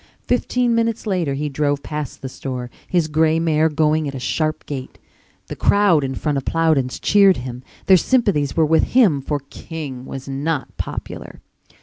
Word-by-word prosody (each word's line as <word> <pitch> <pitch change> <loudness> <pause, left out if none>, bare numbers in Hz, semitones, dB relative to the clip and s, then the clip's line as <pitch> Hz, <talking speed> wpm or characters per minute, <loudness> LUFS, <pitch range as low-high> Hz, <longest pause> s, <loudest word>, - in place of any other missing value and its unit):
Fifteen 245 -1 +1
minutes 230 0 0
later 175 -9 0
he 150 +2 -2
drove 145 0 -1
past 150 -4 -6
the - - -3
store, 125 -2 -6 0.2
his 175 -3 +1
gray 160 +1 +2
mare 160 -1 +2
going 155 0 +1
at 140 - -5
a - - -4
sharp 155 +4 -2
gait. 135 -3 -6 0.5
The - - -7
crowd 200 -7 +3
in 135 0 -3
front 145 -1 -1
of 135 - -11
Plowden's 155 -6 +1
cheered 200 -2 +5
him, 125 0 -6 0.2
their 190 - +7
sympathies 185 - +1
were 160 - +5
with 160 +1 +2
him 180 - +5
for 145 +1 -2
King 140 -6 -7
was 135 0 -7
not 140 +2 -3
popular. - - -6
155 Hz, 170 wpm, -20 LUFS, 135-170 Hz, 0.5 s, their